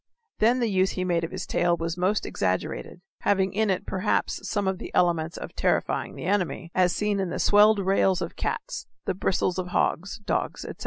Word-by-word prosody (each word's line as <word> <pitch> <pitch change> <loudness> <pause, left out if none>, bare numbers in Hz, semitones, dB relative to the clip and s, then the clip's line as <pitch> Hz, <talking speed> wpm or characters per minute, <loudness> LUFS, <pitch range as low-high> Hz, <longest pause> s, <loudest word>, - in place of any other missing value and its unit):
Then 240 +4 +3
the 235 - +2
use 190 -2 +2
he 185 - -2
made 175 -2 0
of 165 - -2
his 185 -1 -5
tail 175 -1 +1
was 165 0 -3
most 185 +4 0
exaggerated, 95 - -2 0.2
having 190 -1 +1
in 215 +1 +1
it 185 - 0
perhaps 190 +2 -1
some 205 -3 0
of 190 -1 -1
the - - -7
elements 170 -2 +2
of - - -7
terrifying - - 0
the - - -7
enemy, 185 -3 -1
as 180 -1 +3
seen 210 +1 0
in 190 -2 -1
the - - -3
swelled 210 +1 +5
rails 190 -1 +2
of 170 -1 -5
cats, - - -4 0.2
the - - 0
bristles 185 0 0
of 180 - -3
hogs, 180 +1 0
dogs, - - -2
etc. - - -8
185 Hz, 205 wpm, -26 LUFS, 175-205 Hz, 0.2 s, swelled